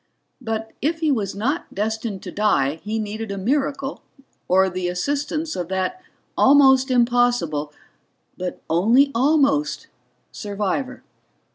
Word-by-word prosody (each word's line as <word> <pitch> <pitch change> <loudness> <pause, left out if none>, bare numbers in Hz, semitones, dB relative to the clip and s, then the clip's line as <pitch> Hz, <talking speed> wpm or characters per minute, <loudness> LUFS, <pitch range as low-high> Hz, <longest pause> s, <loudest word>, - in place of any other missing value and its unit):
But 225 -2 -4
if 320 +4 0
he 315 -2 +2
was 205 -7 -1
not 270 +11 -2
destined 220 -1 -3
to - - -7
die 160 -9 +1
he 215 +2 -3
needed 215 0 -4
a 200 - -4
miracle 275 +5 -1 0.5
or 190 +1 +4
the 185 -1 -3
assistance 290 - -2
of 175 - -3
that 190 - -2 0.3
almost 265 -1 +5
impossible 240 - +1 0.6
but 180 0 -6
only 230 - +4
almost 285 +3 +1 0.4
survivor. 210 +5 -3
225 Hz, 120 wpm, -22 LUFS, 195-275 Hz, 0.6 s, almost